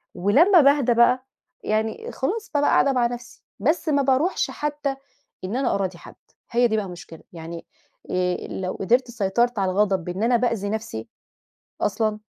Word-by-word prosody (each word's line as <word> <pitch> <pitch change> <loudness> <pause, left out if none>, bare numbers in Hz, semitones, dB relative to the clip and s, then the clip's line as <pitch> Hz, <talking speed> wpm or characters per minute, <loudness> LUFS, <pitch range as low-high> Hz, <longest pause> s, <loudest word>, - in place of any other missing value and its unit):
ولما 310 - +5
باهدى 280 -3 +4
بقى 250 +2 +3 0.4
يعني 220 +1 -2
خلاص، 415 +11 -3
بابقى 290 -1 +2
قاعدة 280 - +4
مع 250 -2 +2
نَفسي. 240 -1 -9 0.2
بس 310 - 0
ما 285 -2 +3
بارُوحش 275 +7 +1
حتى 295 -2 -3 0.5
إن 190 +5 -3
أنا 265 +1 +1
أراضي 190 -3 -2
حَد، - - -13 0.4
هي 240 0 +4
دي 220 -1 0
بقى 210 - -1
المشكلة. 170 -3 -11
يعني 165 0 -8 0.5
آآ، 180 0 -1
لو 185 -1 -4
قِدرت 240 +5 +1
سيطرت 235 +2 0
على 190 -1 +1
الغضب 190 -2 +1
بإن 180 +5 -4
أنا 240 +1 +3
بأذي 230 -4 -1
نَفسي 215 - -4 0.7
أصلًا، 215 +1 0
230 Hz, 160 wpm, -23 LUFS, 195-265 Hz, 0.7 s, ولما